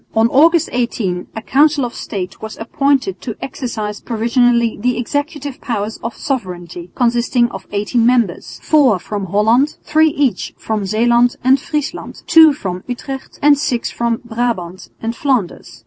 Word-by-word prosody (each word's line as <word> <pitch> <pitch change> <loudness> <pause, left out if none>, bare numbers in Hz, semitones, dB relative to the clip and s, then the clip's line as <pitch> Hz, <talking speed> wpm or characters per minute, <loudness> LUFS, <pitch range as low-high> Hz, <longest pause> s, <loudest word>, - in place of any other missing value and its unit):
On 225 +1 +4
August 325 +5 +4
18 215 -7 -2
a 220 - -5
Council 290 +1 +3
of 240 - -6
State 190 -4 -6
was 220 0 -7
appointed 275 +8 0
to 230 -5 -5
exercise 220 -6 -5
provisionally 235 0 +1
the 250 0 +1
executive 285 +2 -3
powers 220 -2 -3
of 230 +1 -5
sovereignty, 180 - -5
consisting 240 0 +1
of - - -9
eighteen 210 +4 0
members, 235 -7 +1
four 275 -9 +4
from 200 +2 -5
Holland, 225 - +2
three 315 +1 +3
each 285 -4 -1
from 215 -2 -3
Zeeland 235 +3 +3
and 260 +2 +4
Friesland, 300 0 -4
two 320 -1 +7
from 185 -9 -5
Utrecht 265 +2 -6
and 290 -1 +5
six 250 -5 -1
from 235 -1 -1
Brabant 220 -7 -3
and 230 +1 -2
Flanders. 235 - -2
240 Hz, 145 wpm, -17 LUFS, 215-270 Hz, -, two